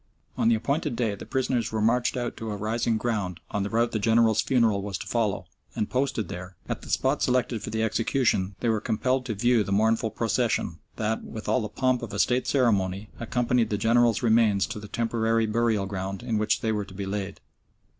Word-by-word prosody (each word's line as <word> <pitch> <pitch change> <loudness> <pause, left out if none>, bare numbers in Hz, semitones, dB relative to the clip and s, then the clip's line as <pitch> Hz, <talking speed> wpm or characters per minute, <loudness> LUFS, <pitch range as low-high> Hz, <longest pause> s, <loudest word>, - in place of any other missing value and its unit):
On - - +2
the 115 - +4
appointed 140 +3 -1
day 115 -3 0
the 100 - -9
prisoners 130 -3 0
were 110 - -1
marched 120 +4 +2
out 120 -1 -3
to 115 - -5
a 105 - -3
rising 110 +2 0
ground 100 -7 -2
on 100 - -1
the 100 - -2
route 115 +2 +1
the 110 - -1
General's 115 0 +3
funeral 115 -6 +2
was 100 -1 -4
to - - -7
follow, 110 -5 -1 0.3
and 105 - -2
posted 130 -4 0
there, 90 -1 -7
at - - -3
the - - -11
spot 135 +2 +1
selected 125 -3 +1
for - - -5
the 110 0 -1
execution, 110 -3 +1
they 120 - +1
were 110 -2 +1
compelled 125 +4 0
to 110 - -2
view 120 +1 +3
the 100 - -5
mournful 110 +2 +2
procession 110 -6 -1 0.2
that, 110 0 -1
with 110 -2 -8
all 130 - +2
the 105 - -4
pomp 130 -2 +1
of - - -6
a - - -3
State 125 +1 +2
ceremony, 105 -6 +1
accompanied 120 -1 +1
the 105 - 0
General's 115 +1 +3
remains 110 -4 +4
to 120 -3 -6
the 105 - -9
temporary 115 0 0
burial 110 -2 +1
ground 95 +1 -4
in 115 -3 -1
which 110 - +1
they 110 - 0
were 105 -2 -1
to 95 - -13
be 100 0 -4
laid. 100 0 -4
110 Hz, 215 wpm, -26 LUFS, 105-120 Hz, 0.3 s, the